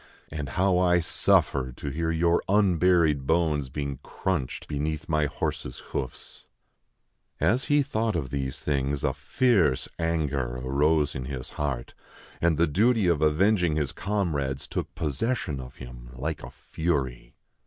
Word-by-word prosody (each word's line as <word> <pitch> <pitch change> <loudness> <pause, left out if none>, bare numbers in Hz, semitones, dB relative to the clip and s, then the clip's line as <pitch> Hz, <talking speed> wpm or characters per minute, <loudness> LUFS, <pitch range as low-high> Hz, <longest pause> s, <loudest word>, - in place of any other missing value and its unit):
And 75 -3 -4
how 95 -1 +3
I 90 -1 +4
suffer 65 -5 +2
to 70 - -5
hear 80 +3 -1
your 85 +1 +2
unburied 90 -7 +3
bones 80 -4 +1
being 70 -1 -4
crunched 85 -8 -3
beneath 75 +1 -3
my 75 -2 +2
horse's 65 -3 -3 0.2
hoofs! 65 - -5 0.4
" - - -50 0.3
As 125 +3 +2
he 145 0 +3
thought 115 -6 -1
of 70 -7 -2
these 65 -1 -3
things, 70 -1 -1
a - - +1
fierce 95 - +2
anger 75 -7 -1
arose 75 +4 +2
in 65 -1 -5
his 65 -1 -6
heart; 70 -5 -3 0.5
and 85 -2 +3
the 85 - +4
duty 105 +7 +3
of 85 -4 +2
avenging 85 +2 +3
his 75 -3 0
comrades 80 -10 -2
took - - -4
possession 75 - -1
of 65 -1 -9
him, - - -10
like 75 +4 -4
a - - -8
fury. 65 -8 -3
75 Hz, 145 wpm, -27 LUFS, 70-85 Hz, 0.5 s, I